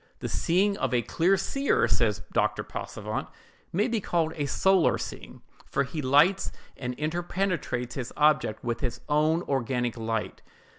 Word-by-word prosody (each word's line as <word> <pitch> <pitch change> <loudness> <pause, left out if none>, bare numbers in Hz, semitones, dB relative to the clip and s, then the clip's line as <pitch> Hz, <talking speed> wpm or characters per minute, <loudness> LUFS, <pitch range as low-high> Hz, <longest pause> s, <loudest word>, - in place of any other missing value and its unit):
"The - - -4
seeing 200 +4 +1
of - - 0
a 120 - +2
clear 180 - +2
seer," 275 +8 +1
says - - +1
Dr. - - +1
Passavent, - - -5 0.4
"may 205 +7 +1
be 230 -3 -1
called 165 -4 0
a 145 -2 -1
solar 190 +3 +3
seeing, - - -8 0.2
for 140 - +1
he 145 +4 -4
lights 150 +9 +4 0.2
and 125 -1 -4
inter 155 +5 -2
penetrates 170 -10 -2
his 130 -3 -5
object 150 -7 +2
with 120 -1 -2
his 120 -3 -3
own 155 +3 +2
organic 125 -3 -1
light, 115 -1 -3
viz. - - -30
150 Hz, 160 wpm, -27 LUFS, 125-180 Hz, 0.4 s, lights